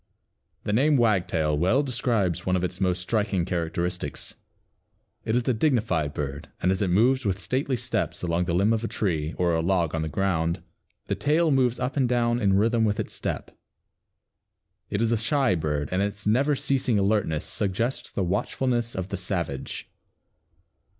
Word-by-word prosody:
The 105 - -1
name 140 +6 +4
Wagtail 90 -9 +2
well 95 - +2
describes 115 - 0
one 90 - +1
of 90 - 0
its 90 +1 -3
most 90 -1 +1
striking 100 -3 0
characteristics. 85 +1 -2 0.9
It 110 - 0
is 125 -1 0
a 130 - +3
dignified 110 - +1
bird, 70 +1 -4
and 90 - +2
as 95 - -1
it 100 - +1
moves 125 +8 +3
with 95 -3 0
stately 130 +5 -1
steps 120 - -2
along 85 0 0
the 85 -1 -1
limb 100 +5 +3
of 115 0 -1
a - - 0
tree, 80 -9 -1
or 90 -1 +2
a 80 - +1
log 85 -2 +1
upon 80 - -2
the 80 - -2
ground, 85 0 0 0.4
the - - -1
tail 155 +2 +2
moves 125 -3 +2
up 130 +2 -2
and 130 -3 +2
down 120 -1 +1
in 95 -2 +3
rhythm 115 +2 +3
with 105 -2 +1
its - - -3
step. - - -4 1.3
It 100 +3 0
is 115 - +1
a 115 - +3
shy 135 +1 +2
bird 75 -4 -1
and 90 +1 +1
its 100 0 -3
"never 135 +7 +3
ceasing 130 -4 +1
alertness 100 -6 +1
suggests 110 +6 -2
the 100 - -2
watchfulness 115 +5 -1
of 95 0 -3
the 100 - -3
savage." 85 -7 -3
100 Hz, 175 wpm, -26 LUFS, 85-120 Hz, 1.3 s, name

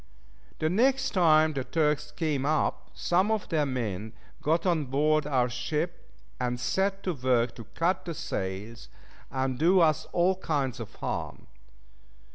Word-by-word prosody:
The 155 - 0
next 260 +9 +2
time 160 -4 +4
the 135 -2 -2
Turks 150 0 0
came 150 -3 -1
up, 155 +2 0
some 185 +4 +2
of 220 -2 0
their 155 -4 +1
men 110 -5 -3 0.3
got 165 +4 +1
on 170 -5 +2
board 150 +3 +2
our 130 -4 +2
ship, 150 +8 -3 0.3
and 125 -1 -1
set 195 +7 0
to 185 - -1
work 125 -3 +1
to 115 - -10
cut 175 +3 +1
the 170 -2 -4
sails, 100 +1 -5 0.4
and 130 -1 -2
do 180 +4 +5
us 155 -3 +3
all 180 +2 +2
kinds 140 -8 -1
of 115 -4 -8
harm. - - -4
150 Hz, 150 wpm, -28 LUFS, 125-170 Hz, 0.4 s, do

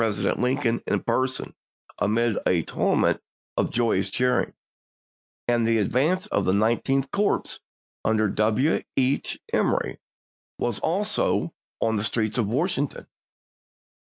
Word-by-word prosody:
dent 105 -3 0
Lincoln 125 -2 +1
in - - +1
person 130 +2 -1 0.5
amid 110 +2 +2
a 85 -3 +2
tumult - - +1 0.3
of - - +1
joyous 110 -5 +1
cheering; 125 +4 +1 0.9
and 120 -1 +2
the 115 0 +3
advance 140 - +1
of - - 0
the 95 - +2
Nineteenth 125 +6 +1
Corps 205 0 0 0.4
under 110 -1 +2
W. 110 +9 +2 0.2
H. 135 +1 +1
Emory - - +1 0.6
was 120 -4 -1
also 195 -1 +1 0.3
in 110 -1 +1
the 105 - -1
streets 110 +1 0
of 110 - +1
Wash 155 - 0
ington. 140 0 -3
120 Hz, 125 wpm, -25 LUFS, 110-135 Hz, 0.9 s, the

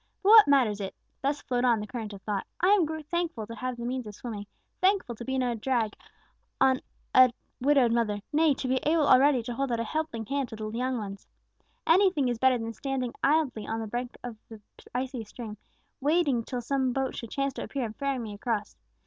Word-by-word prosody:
But 390 - +3
what 440 -1 +10
matters 245 -8 +3
it!" 195 - -5 0.3
thus 285 +2 -1
flowed 245 -1 -1
on 240 -3 +4
the 210 - -4
current 220 -2 -6
of 200 -2 -10
thought 205 -2 -2
"I 365 - +3
am 395 -6 +5 0.2
thankful 330 -7 -2
to 230 - -8
have 250 +2 -4
the 235 - -5
means 250 -1 -3
of 210 - -8
swimming, 210 -4 -6 0.3
thankful 375 -9 +2
to 235 - -8
be 265 +2 -2
no 250 -2 +1
drag 230 -2 0 0.7
on 260 -1 +4 0.3
a 255 -1 +7 0.3
widowed 265 -2 +4
mother 215 -3 0
nay, 310 -1 +4
to 260 - -4
be 260 +1 +2
able 310 +3 +2
already 260 -1 +5
to 240 +1 -4
hold 270 +1 -2
out 235 - 0
a - - 0
helping 235 -3 -3
hand 275 +1 -2
to 225 - -7
the 215 0 -5
young 250 +3 -1
ones. 200 -3 -7 0.6
Anything 335 -6 +4
is 240 -2 -2
better 260 0 +4
than 225 0 -5
standing 260 -2 -3
idly 280 -8 +2
on 225 0 -2
the 225 - -3
brink 240 +3 -4
of 240 -3 -6
the 225 -2 -10 0.4
icy 255 -1 -2
stream, 215 0 -8 0.4
waiting 285 -4 +2
till 245 +1 -4
some 260 +1 0
boat 270 0 -1
should 230 - -6
chance 275 +2 -1
to - - -5
appear 270 -3 -3
and 220 -1 -7
ferry 275 +1 -1
me 225 -4 -5
across. 210 0 -3
250 Hz, 215 wpm, -28 LUFS, 225-275 Hz, 0.7 s, what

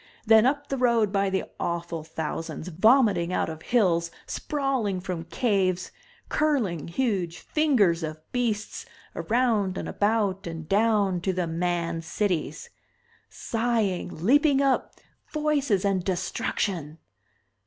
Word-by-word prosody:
Then 220 +1 +6
up 285 +1 -1
the 275 - -2
road, 235 -5 +3
by 200 -1 +1
the 190 0 -1 0.2
awful 170 -1 -3
thousands, 160 +1 -5
vomiting 195 - +3
out 180 - 0
of 160 -1 -7
hills, 175 -8 +2 0.2
sprawling 270 -10 -1
from 180 -2 -5
caves, 185 -4 0 0.4
curling, 235 - 0
huge 180 -4 -1
fingers 230 - +2
of 155 -1 -4
beasts, 225 -4 -2 0.3
around 220 -5 +1
and - - -4
about 205 -3 0
and 165 -2 -6
down 200 -3 +2
to 190 +1 0
the 180 -1 -1
Man 170 0 -1
Cities. 165 -3 -2 0.6
Sighing, 220 -8 -2
leaping 285 +3 +4
up, 275 -1 +1 0.4
voices 285 -10 +1
and 195 -2 +1
destruction! 175 -3 -2
195 Hz, 120 wpm, -26 LUFS, 170-235 Hz, 0.6 s, Then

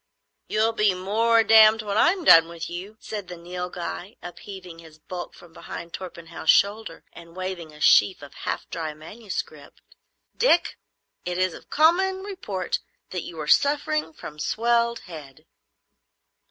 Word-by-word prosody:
"You'll 220 +1 +1
be 210 -4 +2
more 225 +5 +2
damned 220 0 +6
when 205 -1 -3
I'm 345 - +3
done 165 - +8
with 170 -1 -7
you," 190 +5 -7
said 205 -4 -6
the 180 - -8
Nilghai, 180 +3 -6
upheaving 180 -1 -10
his 160 -2 -15
bulk 175 +3 -8
from 175 -2 -17
behind 170 0 -9
Torpenhow's 170 -3 -7
shoulder 205 -3 +2
and 170 0 -14
waving 185 -4 -5
a 150 - -15
sheaf 185 +1 +4
of 145 0 -12
half - - -5
dry 160 -3 -4
manuscript. 160 -4 -8 0.6
"Dick, 350 -9 +2 0.4
it 180 0 -3
is 185 -2 +1
of - - -13
common 375 +5 +3
report 210 - -4 0.3
that 180 - -3
you 165 -1 -9
are 155 - -4
suffering 290 - +2
from 150 -1 -10
swelled 235 +4 +1
head." 150 -6 -12
185 Hz, 145 wpm, -24 LUFS, 170-225 Hz, 0.6 s, done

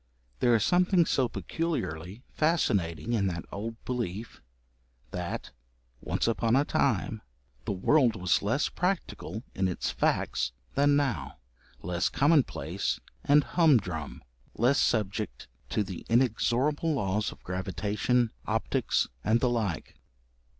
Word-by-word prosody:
There 120 - +4
was 110 -3 +3
something 180 -1 +4
so 130 -5 +1
peculiarly 100 - -3
fascinating 110 - +1
in 100 -4 +2
that 85 -2 -3
old 115 +3 -4
belief, 115 -3 -4 0.7
that 90 -3 -4 0.5
'once - - -1
upon 115 0 +2
a 140 +2 +3
time' - - 0 0.4
the - - -1
world 115 +5 +3
was 90 -2 +2
less 115 +9 +1
practical 170 - -3
in 95 - +1
its 90 - -2
facts - - 0 0.2
than 145 +1 +4
now, 140 -5 -1 0.5
less 90 +1 0
commonplace 100 - +1 0.2
and 145 +1 +5
humdrum, 105 - +1 0.3
less 125 +5 +3
subject 105 -1 -1 0.2
to 105 - +1
the 95 -3 -7
inexorable 130 +6 +2
laws 105 -3 0
of - - -15
gravitation, 105 +6 0 0.2
optics, - - +1 0.2
and 110 +2 +3
the 125 -1 +2
like. 105 -9 -2
115 Hz, 120 wpm, -29 LUFS, 95-140 Hz, 0.7 s, and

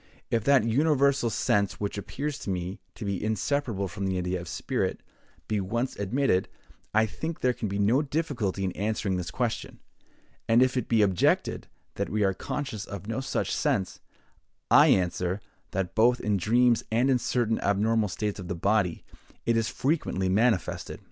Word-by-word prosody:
If 115 -2 +1
that 140 -4 +5
universal 140 +1 +2
sense 100 -2 +1
which 100 -1 -2
appears 140 +8 -4
to - - -6
me 90 +1 -3 0.2
to - - -6
be 100 -2 -2
inseparable 110 -2 -1
from 100 +2 -4
the 95 -1 -1
idea 90 0 -2
of 85 - -9
spirit, - - -2 0.4
be 105 -2 0
once 120 +7 -2
admitted, 100 -1 +1 0.4
I 110 +1 +4
think 160 +9 -5
there 125 -1 +3
can 110 - -4
be 100 0 -3
no 110 +7 +3
difficulty 135 - -2
in 95 - 0
answering 100 -1 -1
this 90 0 -4
question; 120 +3 -3 0.7
and 115 +2 +6
if 130 0 +1
it 125 - -2
be 115 -2 +4
objected 95 -3 +1 0.3
that - - -1
we 105 0 0
are 95 -1 +2
conscious 120 -1 -4
of 100 -2 -7
no 115 +3 -2
such - - -2
sense, 95 -2 0 0.7
I - - +8
answer, 90 +1 +1 0.3
that 95 -2 -2
both 120 +2 +4
in 105 -1 0
dreams 120 +4 +3
and 120 +4 +3
in 125 - +3
certain 115 -2 0
abnormal 105 +2 +1
states 105 +2 -3
of 90 - -7
the 90 - -3
body, 95 0 +1 0.4
it 115 - +2
is 115 -1 +1
frequently 130 - 0
manifested. 105 0 +1
110 Hz, 175 wpm, -27 LUFS, 95-125 Hz, 0.7 s, I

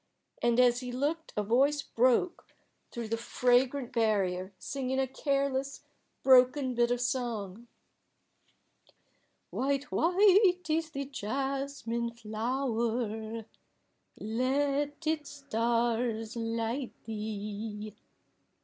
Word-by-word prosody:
And 240 0 +3
as 245 -1 +5
he 250 -1 -5
looked 295 +6 -2
a 210 - +2
voice 275 +7 +2
broke 255 +9 +1 0.4
through 235 -2 -5
the 230 - 0
fragrant 250 +2 +1
barrier 195 -5 +1
singing 265 +6 -3
a 265 - +2
careless, 275 0 -1 0.4
broken 260 +1 +5
bit 240 0 +2
of 245 0 +1
song 235 -4 -3 1.8
"White, 275 +1 -1
white 365 0 +4
is 315 0 0
the 280 -2 -4
jasmine 270 -1 -3
flower; 225 -1 -2 0.7
Let 280 +6 0
its 310 -2 -1
stars 235 -3 -1
light 230 +3 -2
thee." 210 -1 -5
245 Hz, 95 wpm, -30 LUFS, 225-275 Hz, 1.8 s, as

